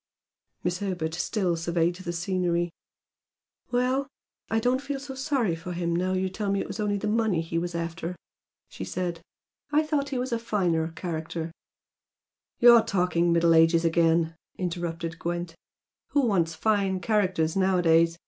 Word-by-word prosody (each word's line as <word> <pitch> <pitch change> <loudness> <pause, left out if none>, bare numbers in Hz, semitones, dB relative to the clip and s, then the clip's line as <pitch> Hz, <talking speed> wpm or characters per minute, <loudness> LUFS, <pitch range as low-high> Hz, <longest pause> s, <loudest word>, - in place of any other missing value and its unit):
Miss 175 +1 -1
Herbert 180 -5 -2
still 180 0 0
surveyed 170 +1 +1
the 175 -1 -5
scenery. 175 -1 0 1.0
"Well, 255 +3 +1 0.4
I 225 - +2
don't 250 +3 +1
feel 280 -1 -4
so 270 0 -7
sorry 265 - 0
for 165 +2 -6
him 170 -1 -1
now 185 +2 0
you 190 0 0
tell 200 +2 -3
me 200 - +1
it - - -2
was - - -7
only 205 -1 0
the 210 - -3
money 215 -4 +1
he 165 0 -2
was 175 0 -4
after" 170 +1 -3 0.5
she - - -8
said 170 - -3 0.5
"I 300 +1 +4
thought 295 -2 0
he 270 - -2
was 250 +1 -2
a 235 - 0
finer 180 -8 0
character 165 -1 -4 0.6
" - - -62
"You're 240 -1 +8
talking 180 -4 +1
'Middle 170 0 +4
Ages' 165 +1 +5
again," 165 0 +2 0.2
interrupted 170 -2 -3
Gwent 175 0 -3 0.6
"Who 285 -3 +3
wants 170 -7 +1
fine 195 0 +1
characters 185 -6 +1
nowadays? 170 -3 +3
180 Hz, 160 wpm, -27 LUFS, 170-215 Hz, 1.0 s, You're